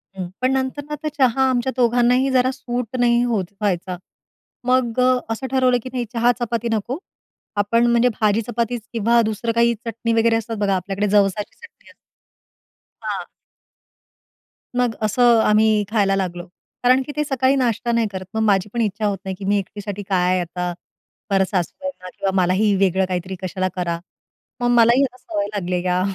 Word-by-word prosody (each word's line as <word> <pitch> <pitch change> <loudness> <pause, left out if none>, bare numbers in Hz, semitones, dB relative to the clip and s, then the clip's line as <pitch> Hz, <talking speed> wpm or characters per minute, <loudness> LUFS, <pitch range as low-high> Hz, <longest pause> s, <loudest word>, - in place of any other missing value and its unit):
हं, 185 -2 -5
पण 255 +1 +2
नंतर 265 +2 -2
ना 300 - -2
तर - - -1
चहा 265 0 +3
आमच्या 255 0 0
दोघांनाही 245 +2 +3
जरा 255 0 +3
सूट 245 -1 -4
नाही 240 0 +4
होत 225 -6 0 0.2
व्हायचा. 185 -2 -1 0.7
मग 255 -2 +2
अ, 255 0 +4
असं 265 +4 -5
ठरवलं 255 -2 +3
की 255 - -6
नाही 245 -2 -1
चहा-चपाती 235 -1 0
नको, 225 +5 -2 0.6
आपण 220 +4 +2
म्हणजे 235 +1 +4
भाजी 215 +1 +3
चपाती 235 +1 -2 0.2
किंवा 235 +1 +3
दुसरं 220 +2 -2
काही 235 0 +4
चटणी 230 0 -2
वगैरे 225 0 +3
असतात 225 0 -4
बघा 200 -2 +1
आपल्याकडे, 195 +3 -2
जवसाची 205 0 +1
चटणी 465 0 -17
असते. - - -18 1.1
हां. - - -4 1.5
मग 245 -2 +1
असं 235 +2 +4
आम्ही 215 0 +3
खायला 200 -3 +2
लागलो. 180 -2 -3 0.4
कारण 255 +2 +5
की 290 - -6
ते 300 - +1
सकाळी 270 -2 +1
नाश्ता 240 -2 0
नाही 230 -1 +2
करत. 190 -1 -6
मग 220 - -1
माझी 200 -1 +2
पण 235 - 0
इच्छा 210 0 -1
होत 200 -1 0
नाही 190 0 -3
की 195 - -6
मी 205 +1 +2
एकटीसाठी 205 +1 -6
काय 185 -1 +2
आता, 180 0 -3 0.6
परत 195 -1 +3
सासूबाईंना 190 - -4
किंवा 195 -1 0
मलाही 195 +3 +2
वेगळं 190 -1 +2
काहीतरी 185 0 -3
कशाला 185 0 -2
करा. 170 -2 -2 0.6
मग 245 - 0
मलाही 235 +3 +5
या 255 -2 -1
सवय 210 -5 -3
लागली 180 -2 -1
या 180 0 +1
225 Hz, 170 wpm, -21 LUFS, 195-245 Hz, 1.5 s, कारण